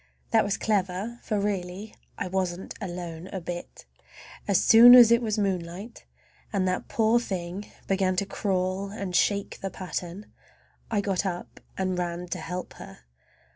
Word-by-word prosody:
That - - +5
was 200 -1 -1
clever, 205 +2 -1
for 210 -2 -1
really 200 0 -3 0.2
I - - -3
wasn't 185 -1 -2
alone 175 -2 -6
a 190 - -5
bit! 175 0 -7 0.6
As 200 -3 +4
soon 240 +2 +9
as 240 -2 +9
it 235 +1 +5
was 220 -2 -1
moonlight, 195 +2 -3 0.5
and 190 -3 0
that 185 0 -2
poor 225 +1 +3
thing 190 -2 -5 0.2
began 190 -1 +1
to 200 - 0
crawl 190 -1 -1
and 195 -3 -5
shake 200 +1 +1
the 195 - -3
pattern, 185 +1 -6 0.6
I 215 -3 +1
got 195 -2 -1
up 180 -3 -5 0.2
and 185 -1 -1
ran 175 0 -3
to - - -3
help 180 +2 -6
her. - - -11
190 Hz, 155 wpm, -27 LUFS, 180-205 Hz, 0.6 s, soon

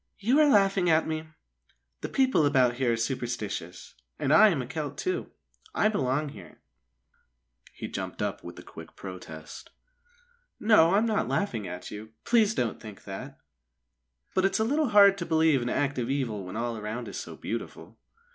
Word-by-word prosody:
"You 240 +8 +2
are 300 -1 +6
laughing 195 -5 +3
at 160 0 +4
me. 160 0 -3 0.7
The - - -4
people 260 - +2
about 130 -4 +3
here 125 -3 +1
are - - -1
superstitious, 110 -8 -4 0.2
and 140 - +1
I 215 +7 +8
am 165 -8 0
a 125 - -3
Celt, 145 +1 -5
too. 370 0 -2 0.5
I 215 - +3
belong 145 -6 -1
here." 100 -9 -13 1.1
He - - -7
jumped - - -6
up - - -3
with - - -9
a - - -10
quick - - -12
protest. 80 -5 -9 0.9
"No, 195 -5 +5
I'm 215 +3 +3
not 220 -2 0
laughing 115 - -2
at 90 0 -7
you. 110 +1 -9
Please 220 -3 +3
don't 120 -3 -2
think 105 -3 -11
that! 130 +8 -8 1.0
But 185 - +1
it's 195 - +2
a 220 - +1
little 290 +4 +1
hard 200 -2 +6
to 170 - -3
believe 160 -4 +3
in 120 - -2
active 130 -4 -1
evil 120 -8 -2
when 90 - -8
all 115 0 -2
around 110 +3 -5
is - - -7
so - - -8
beautiful." - - -7
140 Hz, 175 wpm, -27 LUFS, -, 1.1 s, I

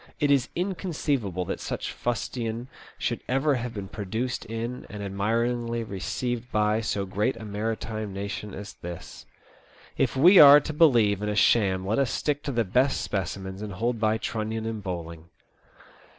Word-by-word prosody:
It 145 -1 +2
is 135 -3 +3
inconceivable 145 - -1
that - - -4
such - - -4
fustian 120 +1 -3 0.3
should - - -2
ever 135 +3 +2
have 125 -2 -3
been 100 -2 -5
produced 110 +5 -3
in 115 +2 -5
and 105 -1 -6
admiringly 115 +4 -1
received 120 +4 -4
by 105 +1 +2
so 100 -3 -1
great 105 +7 0
a 110 - -8
maritime 110 0 -3
nation 100 +1 -5
as 100 +2 -8
this. 85 0 -9 0.7
If - - +1
we 180 +8 +8
are 145 0 +11
to 155 +2 -5
believe 115 - +4
in 105 - -1
a 105 - -1
sham 95 -3 +3
let 110 +6 +1
us 135 -3 +2
stick 145 +1 -1
to 140 - -1
the 120 -3 +1
best 125 +8 +2
specimens 95 0 -4
and 105 -2 -5
hold 115 +4 -1
by 110 0 +2
Trunnion 110 0 -3
and 110 -1 -3
Bowling. 85 -4 -6
110 Hz, 165 wpm, -26 LUFS, 100-125 Hz, 0.7 s, are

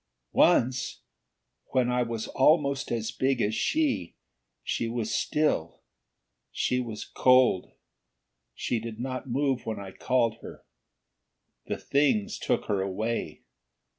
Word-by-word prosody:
"Once, 125 +2 +2 0.7
when 125 -1 +2
I 125 0 +2
was 115 -2 -2
almost 140 -1 +2
as 115 -1 -1
big 130 0 0
as 105 -1 +1
she 285 - 0 0.5
she 115 - -1
was 115 -2 -2
still. 150 - 0 0.7
She 125 - 0
was 115 -4 -5
cold. 125 -7 +3 0.8
She 120 - -1
did 115 0 -7
not 130 +1 -4
move 135 0 0
when 110 -2 -3
I 95 -1 -8
called 115 0 +1
her. - - -11 1.0
The - - -2
Things 200 +10 +1
took 120 - 0
her 100 -3 0
away. 105 +5 -3
120 Hz, 120 wpm, -28 LUFS, 110-135 Hz, 1.0 s, cold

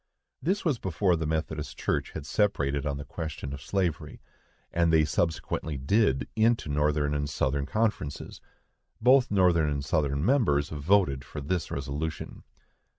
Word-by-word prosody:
This 190 +8 -1
was 145 -8 +1
before 90 0 +1
the 80 -1 -2
Methodist 80 -1 -3
Church - - -1
had 80 - -6
separated 75 -8 0
on 70 -1 -2
the 70 - -7
question 80 -3 -6
of 70 - -7
slavery, 90 -3 -2 0.5
as 85 -1 +3
they 80 -1 +4
subsequently 80 -2 -1
did, 65 - +2
into 115 -6 +2
Northern 75 0 +1
and 75 0 -1
Southern 70 +1 -1
Conferences. 105 -8 -2 0.6
Both 125 +2 +5
Northern 90 -6 +3
and 70 -1 -2
Southern 70 0 0
members 95 - +2
voted 75 -3 +2
for 65 - -8
this 80 +4 -2
resolution. 70 +3 -4
80 Hz, 145 wpm, -28 LUFS, 70-95 Hz, 0.6 s, Both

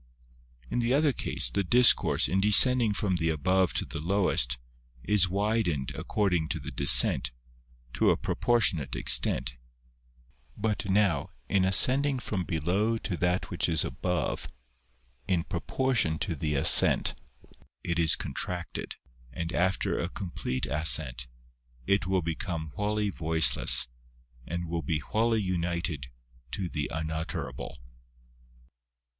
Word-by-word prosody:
In - - 0
the 120 +2 +1
other 145 -1 +2
case, - - -2
the 100 - 0
discourse, 120 +6 +4
in 95 +2 0
descending 115 +3 +5
from 100 -3 -1
the 80 -1 0
above 95 +4 +1
to - - 0
the 80 - -6
lowest, 90 -8 +1 0.5
is 100 -4 +2
widened 100 - -1
according 90 -6 -1
to - - -3
the - - -7
descent, - - +4 0.6
to - - +2
a - - +3
propor 120 0 0
tionate 80 - 0
extent; - - +1 1.0
but 105 -1 -2
now, 95 -7 +1 0.2
in 95 -2 +2
ascending 130 +8 +3
from 100 -7 -4
below 95 +9 0
to 100 -4 -4
that 90 +3 -1
which 85 -1 -1
is 80 -3 +2
above, 90 +7 -3 0.8
in 90 -3 +1
proportion 100 -1 -1
to 85 0 -3
the 75 0 -2
ascent, 70 - +4 0.7
it 85 0 -2
is 80 -2 +3
contracted, 90 -2 -5 0.4
and 85 +3 -5
after 90 +1 0
a 85 - -2
complete 85 -10 -4
ascent, 70 -4 +1 0.6
it 100 +2 +1
will 95 -2 0
become 80 -1 -4
wholly 105 +1 -1
voiceless, 80 -6 +4 0.6
and 85 +1 -4
will 85 0 -3
be 80 -2 -1
wholly 110 +7 0
united 85 -6 -2 0.4
to 95 - -3
the 75 -4 -4
unutterable. 80 -3 -5
90 Hz, 125 wpm, -28 LUFS, 80-105 Hz, 1.0 s, descending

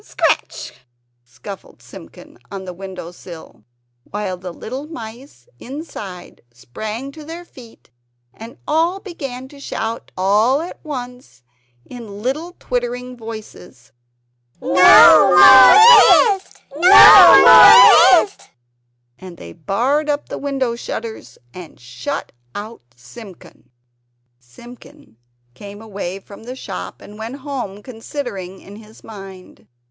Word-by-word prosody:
scratch!" - - -4 0.5
scuffled 190 - -14
Simpkin - - -16
on 195 -1 -9
the 180 - -9
window 185 -2 -11
sill; 170 - -15 0.5
while 205 -2 -6
the 180 0 -10
little 260 - -10
mice 245 - -13
inside 215 - -11
sprang 215 - -9
to 310 +2 -14
their 335 +3 -11
feet, 235 - -19 0.4
and 225 +2 -14
all 330 +5 -1
began 275 - -10
to 280 +1 -18
shout 225 -4 -7
all 210 +8 0
at 335 +3 -10
once 250 - -10 0.4
in 215 -5 -12
little 310 +8 -5
twittering 250 0 -6
voices: 215 - -13 0.7
"No - - -9
more 255 - +6
twist! 380 - -26
No 360 +6 +7
more - - +7
twist!" 400 - -16 0.7
And 185 -2 -13
they 85 0 -13
barred 270 - -3
up 290 0 -4
the - - -8
window 270 -4 -4
shutters 230 -1 -9 0.2
and 180 -3 -14
shut 120 0 -8 0.2
out 215 +3 -10
Simpkin. 170 - -17 0.7
Simpkin 125 - -18 0.4
came 200 +9 -13
away 195 -4 -8
from 200 +2 -16
the 250 +1 -9
shop - - -10
and 210 +1 -15
went 225 +4 -8
home 245 -8 -8
considering 225 -6 -9
in 200 +1 -15
his 220 0 -19
mind. 195 -3 -14
225 Hz, 115 wpm, -16 LUFS, 190-270 Hz, 0.7 s, No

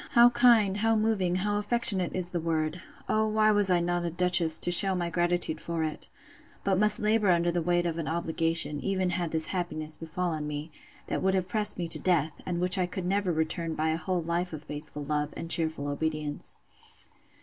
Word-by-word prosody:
—How 240 0 +6
kind, 225 -6 +3
how 225 +2 +1
moving, 215 -5 0
how 205 +2 -1
affectionate 210 -4 +3
is 180 -1 -4
the 175 - -2
word! 160 0 -2 0.3
O 220 0 +1
why 215 0 +2
was 205 -2 +3
I 180 -1 +3
not 175 0 -1
a 170 - -2
duchess, 175 -2 +4
to 175 - +4
shew 190 +2 +5
my 175 -1 -3
gratitude 175 -2 -1
for 165 -1 -3
it! 155 -1 -6 0.5
But 190 -1 0
must 210 0 +4
labour 210 -1 +1
under 175 -1 +2
the 175 0 -1
weight 175 +1 0
of 170 -1 -3
an 160 - -4
obligation, 165 -2 0
even 190 -2 -1
had 175 -2 -2
this 160 0 -1
happiness 155 -4 -3
befallen 165 -2 -4
me, 150 +2 -6 0.3
that - - -3
would 190 0 +1
have 185 -1 -1
pressed 210 +2 +2
me 175 -2 -3
to - - +3
death, 160 -4 -1
and 175 -1 -2
which 180 +1 +4
I 180 -1 -1
never 190 +1 -1
could 160 - -4
return 160 +1 -1
by 155 +1 -1
a 160 - -1
whole 175 +1 -3
life 170 +1 -3
of 155 -1 -8
faithful 150 0 -8
love, 150 0 -3
and 165 - -5
cheerful 160 -4 -1
obedience. 150 0 -4
175 Hz, 205 wpm, -27 LUFS, 160-190 Hz, 0.5 s, How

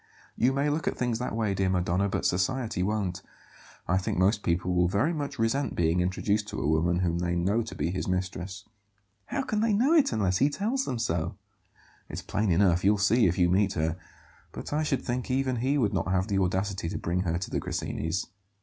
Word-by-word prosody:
"You 125 +3 +3
may 140 +2 0
look 150 +2 -1
at - - -1
things 120 -2 -1
that 125 - -3
way, 110 -3 0
dear 95 -1 0
Madonna, 90 +2 +1
but - - -2
society 110 +3 0
won't. 95 -2 -1 0.7
I 90 +2 +2
think 95 - -2
most 100 +4 +3
people 90 0 0
will 90 0 +3
very 105 - +1
much 145 -3 -4
resent 115 +6 0
being 85 +1 +2
introduced 100 +3 0
to - - -5
a 70 - -1
woman 85 +3 +2
whom 85 -1 0
they 85 0 -1
know 100 +7 +1
to - - -7
be 85 - -1
his 95 - -3
mistress." 90 0 -3 0.6
"How 275 - -2
can 215 -4 -1
they 225 -1 +2
know 250 +10 +3
it 315 -4 +4
unless 100 -5 +1
he 140 - +4
tells 230 - -1
them 125 - -2
so?" 85 -8 -1 0.7
"It's - - -6
plain 105 0 -1
enough; 90 0 +3
you'll 105 +2 +4
see 105 +3 +4
if 90 +2 0
you 90 -2 +4
meet 95 +2 +2
her. 80 0 0 0.6
But - - -6
I 150 - +1
should 145 -4 -1
think 125 +1 -3
even 130 -1 0
he 135 +5 +1
would 110 -7 +1
not 85 -2 -1
have 95 +1 +1
the 100 -2 +1
audacity 95 -1 -1
to - - -4
bring 85 +2 -1
her 85 -2 0
to 90 - -5
the - - 0
Grassinis'." 80 +3 -3
95 Hz, 220 wpm, -28 LUFS, 90-125 Hz, 0.7 s, it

